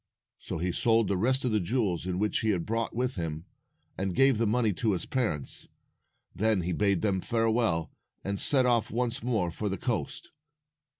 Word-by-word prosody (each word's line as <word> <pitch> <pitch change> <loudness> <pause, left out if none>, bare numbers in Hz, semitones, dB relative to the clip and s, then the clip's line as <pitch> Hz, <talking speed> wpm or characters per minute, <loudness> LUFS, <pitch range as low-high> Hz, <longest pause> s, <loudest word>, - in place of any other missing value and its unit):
So - - -5
he 90 +2 -1
sold 115 +3 +2
the 100 - 0
rest 130 +8 +1
of 125 - +1
the 110 - +2
jewels 95 -3 -1
which 95 +4 0
he 110 - 0
had 90 -5 0
brought 115 +1 -2
with 125 -1 -1
him, 80 -1 -4 0.5
and 95 -2 -2
gave 135 -4 +4
the 115 - +2
money 110 -1 +2
to 110 +3 0
his 90 - -1
parents. 105 - -2 0.7
Then 105 0 +2
he 90 +1 -2
bade 100 0 +1
them 95 -3 +1
farewell, 115 -7 +1 0.3
and 100 0 -3
set 130 -3 +4
*off 120 -3 +2
once 120 0 -1
more 110 -8 0
for 105 +5 -3
the 95 - -3
coast. 110 - -3
105 Hz, 185 wpm, -28 LUFS, 90-115 Hz, 0.7 s, gave